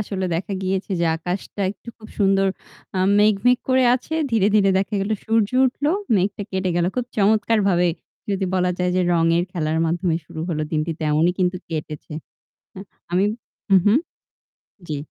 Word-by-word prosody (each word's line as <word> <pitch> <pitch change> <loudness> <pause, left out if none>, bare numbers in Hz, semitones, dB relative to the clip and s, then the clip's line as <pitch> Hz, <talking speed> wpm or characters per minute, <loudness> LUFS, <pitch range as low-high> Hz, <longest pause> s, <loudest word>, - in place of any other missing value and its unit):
আসলে 190 -2 -3
দেখা 190 +5 -3
গিয়েছে 190 +2 -2
যে 170 - +2
আকাশটা 180 +4 -5
একটু 210 - -13
খুব 215 -1 -13
সুন্দর 195 -1 +3 0.5
আ - - +1 0.2
মেঘ, 210 +1 +5
মেঘ 250 0 +5
করে 260 0 +4
আছে। 265 +5 -4 0.2
ধীরে, 220 -4 +3
ধীরে 200 -2 +4
দেখা 200 +2 -2
গেল 195 +2 -2
সূর্য 225 -1 +1 0.2
উঠল, 260 +3 -4 0.3
মেঘটা 200 +2 -1
কেটে 190 -1 -1
গেল। 175 - +2
খুব 250 - 0
চমৎকার 215 +2 +3
ভাবে 175 -1 +3 0.4
যদি 195 -1 0
বলা 180 -1 +2
যায় 180 0 +1
যে - - +3
রঙের 165 +1 +2
খেলার 160 -2 -1
মাধ্যমে 170 0 0
শুরু 160 - -8
হল 160 -3 -2
দিনটি 155 +1 0
তেমনই 155 +3 +2
কিন্তু 180 0 +1
কেটেছে। 155 -1 -6 1.0
আমি 185 +3 +3 0.5
উ - - +8
হুম। 210 +5 +5 0.9
জ্বী। 150 - -3
190 Hz, 165 wpm, -22 LUFS, 170-210 Hz, 1.0 s, উ